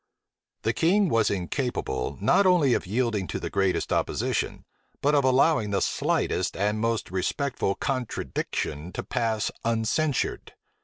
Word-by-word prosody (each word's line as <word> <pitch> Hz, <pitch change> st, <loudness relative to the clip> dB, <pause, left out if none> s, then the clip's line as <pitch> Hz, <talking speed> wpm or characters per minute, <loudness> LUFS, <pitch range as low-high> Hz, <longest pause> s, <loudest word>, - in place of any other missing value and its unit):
The 115 Hz, -, +1 dB
king 185 Hz, -, +3 dB
was 115 Hz, -4 st, +3 dB
incapable, 100 Hz, -, -2 dB
not 150 Hz, -, +4 dB
only 165 Hz, -8 st, +4 dB
of -, -, -1 dB
yielding 110 Hz, -3 st, 0 dB
to -, -, -3 dB
the -, -, -5 dB
greatest 95 Hz, -1 st, 0 dB
opposition, -, -, -1 dB, 0.3 s
but 145 Hz, +2 st, +2 dB
of 145 Hz, -1 st, +4 dB
allowing 130 Hz, -3 st, +3 dB
the 100 Hz, -1 st, +1 dB
slightest -, -, 0 dB
and 105 Hz, +2 st, 0 dB
most 115 Hz, -3 st, -1 dB
respectful 100 Hz, +3 st, -1 dB
contradiction 110 Hz, -, -3 dB
to -, -, -4 dB
pass 110 Hz, -2 st, -1 dB
uncensured. 115 Hz, +5 st, 0 dB
115 Hz, 135 wpm, -26 LUFS, 100-140 Hz, 0.3 s, not